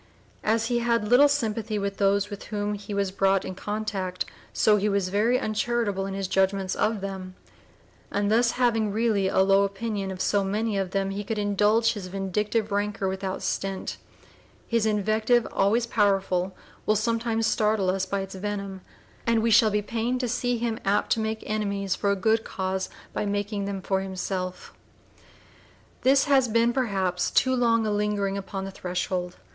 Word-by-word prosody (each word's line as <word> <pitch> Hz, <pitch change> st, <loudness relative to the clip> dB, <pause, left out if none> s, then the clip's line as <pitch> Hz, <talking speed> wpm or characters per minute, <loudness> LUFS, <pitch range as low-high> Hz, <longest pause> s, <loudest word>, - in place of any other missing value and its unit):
As 225 Hz, +1 st, +2 dB
he 240 Hz, +1 st, +1 dB
had 230 Hz, -2 st, +1 dB
little 260 Hz, +4 st, +7 dB
sympathy 225 Hz, -6 st, -1 dB
with 200 Hz, -1 st, -3 dB
those 200 Hz, +1 st, +2 dB
with 205 Hz, -, -7 dB
whom 205 Hz, -1 st, -2 dB
he 205 Hz, 0 st, -7 dB
was 200 Hz, -1 st, 0 dB
brought 195 Hz, 0 st, +2 dB
in -, -, -4 dB
contact, 195 Hz, -2 st, -3 dB, 0.3 s
so 210 Hz, -1 st, +4 dB
he 210 Hz, +1 st, +1 dB
was 200 Hz, -2 st, 0 dB
very 220 Hz, +6 st, +2 dB
uncharitable 215 Hz, -3 st, -1 dB
in 195 Hz, -, -4 dB
his 195 Hz, -1 st, -2 dB
judgment 190 Hz, 0 st, +1 dB
of 215 Hz, -2 st, 0 dB
them; 190 Hz, -1 st, -6 dB, 0.7 s
and 205 Hz, 0 st, 0 dB
thus 230 Hz, +1 st, +3 dB
having 230 Hz, -4 st, +1 dB
really 215 Hz, -2 st, +1 dB
a 190 Hz, -, +3 dB
low 195 Hz, +1 st, +5 dB
opinion 200 Hz, 0 st, -3 dB
of 190 Hz, -1 st, -6 dB
so 200 Hz, +1 st, +2 dB
many 210 Hz, +2 st, -1 dB
of 195 Hz, -2 st, -1 dB
them 195 Hz, +1 st, -1 dB
he 200 Hz, +1 st, -4 dB
could 220 Hz, +2 st, -3 dB
indulge 210 Hz, +2 st, +2 dB
his 200 Hz, -4 st, -6 dB
vindictive 205 Hz, +3 st, -1 dB
rancor 205 Hz, -1 st, -1 dB
without 190 Hz, 0 st, -3 dB
stint; 195 Hz, -1 st, -3 dB, 0.7 s
his 230 Hz, -2 st, +1 dB
invective, 215 Hz, +3 st, +2 dB
always 220 Hz, +5 st, +2 dB
powerful, 195 Hz, -4 st, +1 dB, 0.3 s
will 215 Hz, -, +4 dB
sometimes 225 Hz, +1 st, 0 dB
startle 210 Hz, -4 st, +2 dB
us 190 Hz, 0 st, -2 dB
by 200 Hz, +1 st, -1 dB
its 195 Hz, 0 st, -7 dB
venom, 195 Hz, -1 st, -4 dB, 0.5 s
and 230 Hz, -1 st, +3 dB
we 230 Hz, -, +2 dB
shall 220 Hz, +1 st, +6 dB
be 210 Hz, 0 st, 0 dB
pained 235 Hz, +4 st, -1 dB
to 250 Hz, -, -1 dB
see 245 Hz, +1 st, 0 dB
him 230 Hz, -1 st, -2 dB
apt 200 Hz, +1 st, +1 dB
to -, -, +3 dB
make 220 Hz, 0 st, -2 dB
enemies 200 Hz, -2 st, -1 dB
for 200 Hz, -, -1 dB
a 200 Hz, -, +3 dB
good 220 Hz, +3 st, +2 dB
cause 190 Hz, 0 st, -3 dB, 0.2 s
by -, -, -1 dB
making 205 Hz, 0 st, -2 dB
them 195 Hz, -2 st, -4 dB
for 190 Hz, -1 st, 0 dB
himself. 185 Hz, -1 st, -4 dB, 1.3 s
This 270 Hz, +1 st, +5 dB
has 270 Hz, -3 st, +3 dB
been, 230 Hz, +1 st, +2 dB
perhaps, 195 Hz, -8 st, 0 dB
too 260 Hz, 0 st, +3 dB
long 230 Hz, -2 st, +2 dB
a 215 Hz, -, 0 dB
lingering 205 Hz, -1 st, 0 dB
upon 195 Hz, 0 st, -5 dB
the 195 Hz, -, -6 dB
threshold. 180 Hz, -1 st, -3 dB
205 Hz, 175 wpm, -26 LUFS, 195-225 Hz, 1.3 s, little